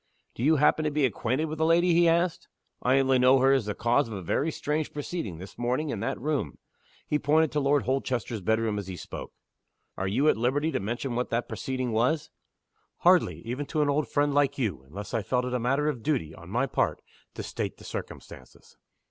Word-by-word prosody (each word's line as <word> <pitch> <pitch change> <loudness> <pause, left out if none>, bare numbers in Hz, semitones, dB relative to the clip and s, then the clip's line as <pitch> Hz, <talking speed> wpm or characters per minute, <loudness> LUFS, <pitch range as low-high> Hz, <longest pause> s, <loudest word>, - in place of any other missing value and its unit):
"Do - - -8
you 155 +5 +4
happen 150 +2 +3
to 155 - +1
be 150 -1 +2
acquainted 130 +5 -1
with 155 0 -5
the 160 - +3
lady?" 170 +1 +4
he 170 0 +5
asked 170 +1 +1 0.3
"I 130 +2 +3
only 135 -1 +3
know 130 +2 +6
her 135 +1 +4
as 130 -5 +2
the 105 - -2
cause 120 +5 +2
of 110 - -6
a 95 - -6
very 145 - 0
strange 150 0 -2
proceeding, 145 - -4
this 95 +3 -11
morning, 125 +5 0
in 110 - -3
that - - -2
room." 140 - -2 0.5
He 150 - 0
pointed 155 +1 +3
to 150 - 0
Lord 140 -2 +2
Holchester's 120 -3 -2
bedroom 110 +2 0
as 100 - -7
he 95 -2 -6
spoke. - - -8 0.6
"Are 95 - -2
you 135 +10 +1
at - - +4
liberty 140 +7 +1
to - - -1
mention 120 +6 -3
what 125 +1 -1
the 115 +1 0
proceeding 130 -2 -3
was?" 125 +8 +1 0.7
"Hardly - - +4
even 130 +5 -4
to 155 -2 +1
an 145 - +1
old 145 +1 0
friend 145 0 +1
like 140 -1 +2
you 100 - -2
unless 100 - -8
I 115 - +1
felt 125 +4 0
it 125 - -3
a 125 - +1
matter 135 +5 +1
of 135 -6 -2
duty, 120 - -1
on 85 +1 -12
my 120 +7 +1
part, 135 - -1 0.3
to - - -5
state - - -4
the - - -15
circumstances. 65 - -9
130 Hz, 220 wpm, -27 LUFS, 115-150 Hz, 0.7 s, know